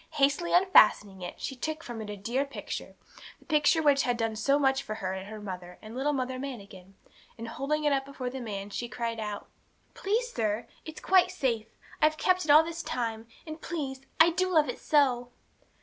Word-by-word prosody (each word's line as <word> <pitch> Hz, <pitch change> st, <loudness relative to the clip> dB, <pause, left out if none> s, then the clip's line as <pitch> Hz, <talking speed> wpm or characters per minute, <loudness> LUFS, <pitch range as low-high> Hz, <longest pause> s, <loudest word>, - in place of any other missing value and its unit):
Hastily 295 Hz, +4 st, +2 dB
unfastening 210 Hz, -, +5 dB
it, 175 Hz, -, -7 dB
she 270 Hz, -, -4 dB
took 315 Hz, +5 st, -4 dB
from 235 Hz, -2 st, -6 dB
it 210 Hz, -, -7 dB
her 210 Hz, -, -4 dB
dear 235 Hz, +7 st, -1 dB
picture 280 Hz, -, -7 dB, 0.4 s
the -, -, -24 dB
picture 310 Hz, 0 st, +3 dB
which 285 Hz, -2 st, +5 dB
had 245 Hz, -1 st, 0 dB
done 225 Hz, -1 st, -1 dB
so 275 Hz, +6 st, +2 dB
much 270 Hz, -1 st, +2 dB
for 215 Hz, -5 st, -5 dB
her 190 Hz, -3 st, -3 dB
and 190 Hz, +1 st, -6 dB
her 215 Hz, 0 st, -8 dB
mother 180 Hz, -3 st, -7 dB
and 220 Hz, +1 st, -10 dB
little 275 Hz, +3 st, 0 dB
Mother 260 Hz, -2 st, -2 dB
Manikin 200 Hz, -8 st, -8 dB, 0.4 s
and, 230 Hz, 0 st, -6 dB
holding 285 Hz, +6 st, -2 dB
it 295 Hz, -1 st, +3 dB
up 270 Hz, -1 st, +1 dB
before 270 Hz, -2 st, -6 dB
the 265 Hz, -, -6 dB
old 245 Hz, -, -7 dB
man, 200 Hz, -1 st, -5 dB
she 240 Hz, +3 st, -4 dB
cried 230 Hz, 0 st, -3 dB
out 210 Hz, -1 st, -5 dB, 0.5 s
'Please, 465 Hz, +5 st, -1 dB
sir, 215 Hz, 0 st, -1 dB, 0.2 s
it's 315 Hz, 0 st, -8 dB
quite 370 Hz, -1 st, +4 dB
safe. 245 Hz, -12 st, -1 dB, 0.3 s
I've 310 Hz, 0 st, +4 dB
kept 370 Hz, +1 st, +2 dB
it -, -, -8 dB
all 300 Hz, +2 st, +8 dB
this 330 Hz, 0 st, -5 dB
time; 225 Hz, -4 st, -3 dB, 0.2 s
and, 310 Hz, 0 st, -8 dB
please, 275 Hz, -6 st, -4 dB, 0.2 s
I 325 Hz, +1 st, +7 dB
do 370 Hz, +2 st, 0 dB
love 310 Hz, -4 st, +4 dB
it -, -, -4 dB
so!' 255 Hz, -5 st, +2 dB
265 Hz, 210 wpm, -29 LUFS, 220-305 Hz, 0.5 s, all